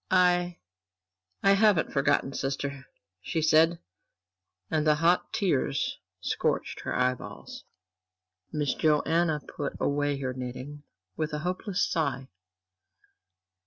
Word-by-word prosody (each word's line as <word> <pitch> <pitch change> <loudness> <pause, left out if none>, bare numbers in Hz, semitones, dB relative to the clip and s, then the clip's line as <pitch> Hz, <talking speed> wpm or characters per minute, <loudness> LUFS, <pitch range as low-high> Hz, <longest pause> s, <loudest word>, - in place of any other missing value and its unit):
"I 180 -1 +3 0.9
I 195 - +6
haven't 200 -4 +3
forgotten, 140 -1 +2
sister," 135 0 -3 0.3
she 165 - -2
said, 160 +2 +4 0.9
and 155 -1 +1
the 150 - +5
hot 170 +4 +2
tears 145 -7 0 0.2
scorched - - -1
her - - -3
eyeballs. 125 0 -3 0.9
Miss 150 -3 0
Joanna 155 +1 +2
put 145 0 -5
away 145 0 0
her 130 -2 -3
knitting 130 +3 -7 0.3
with 155 +4 -2
a - - 0
hopeless 185 +1 -1
sigh. 135 -5 -1
150 Hz, 105 wpm, -28 LUFS, 140-170 Hz, 0.9 s, I